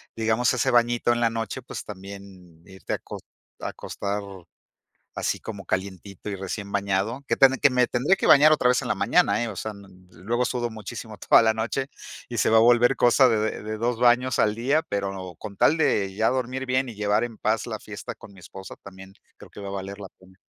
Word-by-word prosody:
digamos, 115 Hz, +4 st, +1 dB
ese 120 Hz, -, +1 dB
bañito 120 Hz, 0 st, +2 dB
en 120 Hz, -, -2 dB
la 115 Hz, -, +3 dB
noche, 115 Hz, +3 st, -4 dB
pues 125 Hz, -, -8 dB
también 95 Hz, -4 st, -11 dB
irte 95 Hz, -1 st, -7 dB
acos -, -, -6 dB, 0.4 s
a -, -, -3 dB
acostar 100 Hz, +1 st, -4 dB, 0.9 s
así -, -, -2 dB
como 100 Hz, -3 st, -8 dB
calientito 95 Hz, +1 st, -5 dB
y 100 Hz, -, -3 dB
recién 100 Hz, +1 st, -6 dB
bañado. 100 Hz, +5 st, -1 dB
Que -, -, +1 dB
tamb 135 Hz, -1 st, +5 dB
que 145 Hz, -, +5 dB
me 125 Hz, -1 st, +3 dB
tendré 130 Hz, +12 st, +1 dB
que -, -, -1 dB
bañar 155 Hz, +1 st, +7 dB
otra 125 Hz, -, +2 dB
vez 125 Hz, -, +2 dB
en -, -, -5 dB
la -, -, 0 dB
mañana, 105 Hz, +4 st, +2 dB
¿eh? 115 Hz, -, -3 dB
O 100 Hz, -, -8 dB
sea, 110 Hz, +2 st, -4 dB
no 100 Hz, -1 st, -14 dB
n 90 Hz, 0 st, -20 dB
yo 85 Hz, -, -19 dB
luego 120 Hz, +7 st, -1 dB
sudo 120 Hz, -2 st, -2 dB
muchísimo 110 Hz, 0 st, -8 dB
toda -, -, +5 dB
la 110 Hz, -1 st, +3 dB
noche 120 Hz, +5 st, -2 dB, 0.4 s
y 120 Hz, -, -5 dB
se 95 Hz, -, +2 dB
va 115 Hz, -, +3 dB
a -, -, +8 dB
volver 120 Hz, +2 st, +5 dB
cosa 125 Hz, +2 st, +5 dB
de 115 Hz, -, +2 dB
de 110 Hz, +1 st, -2 dB
de 110 Hz, 0 st, -4 dB
2 120 Hz, +1 st, -1 dB
baños 125 Hz, +1 st, +3 dB
al 105 Hz, -1 st, +2 dB
día, 140 Hz, +7 st, +1 dB
pero 95 Hz, -3 st, -4 dB
con 100 Hz, -2 st, -9 dB
tal 155 Hz, -, +4 dB
de 100 Hz, -11 st, +1 dB
ya 110 Hz, +2 st, +2 dB
dormir 130 Hz, +1 st, -2 dB
bien 130 Hz, 0 st, 0 dB
y 115 Hz, -, -8 dB
llevar 105 Hz, +2 st, +1 dB
en 115 Hz, -3 st, -10 dB
paz 110 Hz, +1 st, -1 dB
la -, -, -5 dB
fiesta -, -, -8 dB
con -, -, -14 dB
mi 95 Hz, -, -16 dB
esposa, 95 Hz, +2 st, -10 dB
también 95 Hz, 0 st, -12 dB, 0.2 s
creo -, -, -15 dB
que -, -, -12 dB
va 100 Hz, -, -7 dB
a -, -, -5 dB
valer 100 Hz, +1 st, -6 dB
la 100 Hz, -, -7 dB
pena. 95 Hz, 0 st, -21 dB
110 Hz, 230 wpm, -25 LUFS, 100-120 Hz, 0.9 s, a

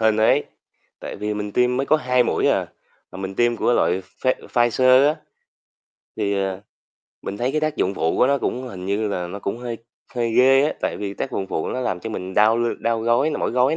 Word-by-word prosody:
hên 110 Hz, -1 st, +3 dB
ấy, 110 Hz, +1 st, +3 dB, 0.6 s
tại -, -, -7 dB
vì 105 Hz, +1 st, -3 dB
mình 105 Hz, -1 st, -4 dB
tiêm 125 Hz, 0 st, +2 dB
mới 135 Hz, -, -1 dB
có 155 Hz, -, +4 dB
2 125 Hz, -3 st, +2 dB
mũi -, -, 0 dB
à, -, -, +1 dB, 0.5 s
mà -, -, -8 dB
mình 95 Hz, 0 st, -5 dB
tiêm 120 Hz, +1 st, +2 dB
của -, -, +1 dB
loại 95 Hz, -5 st, +1 dB, 0.2 s
Pfi 130 Hz, -, +4 dB, 0.2 s
Pfizer 130 Hz, +3 st, +4 dB
á, 155 Hz, -, 0 dB, 1.0 s
thì, 100 Hz, -2 st, 0 dB
à, 95 Hz, 0 st, -4 dB, 0.6 s
mình 100 Hz, -, -5 dB
thấy 125 Hz, +4 st, -1 dB
cái 155 Hz, -, 0 dB
tác 155 Hz, -1 st, -1 dB
dụng 95 Hz, +2 st, 0 dB
phụ 80 Hz, -, 0 dB
của 125 Hz, -, +4 dB
nó 140 Hz, 0 st, +2 dB
cũng 125 Hz, -, -2 dB
hình 95 Hz, -4 st, -8 dB
như 105 Hz, +2 st, 0 dB
là 90 Hz, -3 st, -3 dB
nó 100 Hz, +3 st, -7 dB
cũng 100 Hz, +3 st, -4 dB
hơi 120 Hz, -1 st, -5 dB, 0.4 s
hơi 120 Hz, -2 st, -1 dB
ghê 135 Hz, +2 st, +5 dB
á, 150 Hz, -, 0 dB
tại -, -, -2 dB
vì 100 Hz, -1 st, -5 dB
tác -, -, -4 dB
dụng 95 Hz, -, -2 dB
phụ 80 Hz, -, -3 dB
nó 130 Hz, -, -3 dB
làm 95 Hz, -7 st, -2 dB
cho 115 Hz, -, -6 dB
mình 95 Hz, -2 st, -5 dB
đau 110 Hz, +2 st, +4 dB
l 120 Hz, 0 st, 0 dB
đau 115 Hz, -1 st, 0 dB
gối 120 Hz, +7 st, +2 dB
nè, -, -, -2 dB
mỏi -, -, -1 dB
gối 125 Hz, +5 st, +2 dB
115 Hz, 240 wpm, -22 LUFS, 100-125 Hz, 1.0 s, ghê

